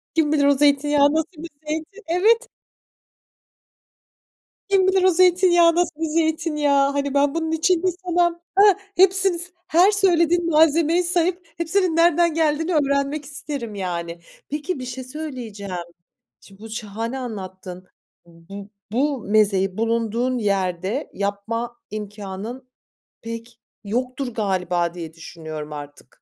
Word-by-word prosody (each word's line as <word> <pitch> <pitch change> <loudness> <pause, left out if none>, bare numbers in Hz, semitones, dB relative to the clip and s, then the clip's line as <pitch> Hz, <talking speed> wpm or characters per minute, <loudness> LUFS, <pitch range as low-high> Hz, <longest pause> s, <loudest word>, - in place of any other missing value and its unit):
Kim 310 -2 +2
bilir 285 -2 +3
o 285 - +5
zeytinyağı, 290 0 +3
nasıl 320 +1 -1
bir 340 - -7 0.2
zeytin? 315 +1 -2 0.2
Evet! 440 +8 +2 2.2
Kim 385 -2 +3
bilir 380 -1 +3
o - - +6
zeytinyağı 350 -1 +4
nasıl 340 -3 -1
bir 325 - 0
zeytinyağı? 300 -3 +1
Hani 280 0 -2
ben 280 +1 +2
bunun 320 -1 -2
için 330 +2 +2
bir 375 - +2 0.2
sana, 345 -1 +1 0.2
hah 405 -1 +7 0.2
Hepsini 380 -1 +4
s 355 +2 -4 0.2
her 360 +5 +5
söylediğin 345 -4 +2
malzemeyi 320 +2 +4
sayıp 355 0 0
hepsinin 335 0 0
nereden 340 -1 +4
geldiğini 320 +2 +1
öğrenmek 280 0 0
isterim 275 -6 -5
yani. 170 -3 -4 0.3
Peki 300 +3 -3
bir 255 - -6
şey 255 +1 -6
söyleyeceğim. 250 -9 -7 0.7
Şimdi 195 +1 -18
bu 225 - -9
şahane 225 +3 -5
anlattın. 185 -5 -7 0.4
Bu 190 +4 -12 0.2
bu 275 +3 0
mezeyi 195 -2 +2
bulunduğun 230 +2 0
yerde 195 - -1
yapma 225 +4 -3
imkânın 210 +4 -7 0.5
pek 230 +1 -8 0.2
yoktur 250 +3 -3
galiba 180 -4 -1
diye 165 -2 -8
düşünüyorum 155 -2 -8
artık. 145 0 -9
280 Hz, 125 wpm, -22 LUFS, 210-335 Hz, 2.2 s, hah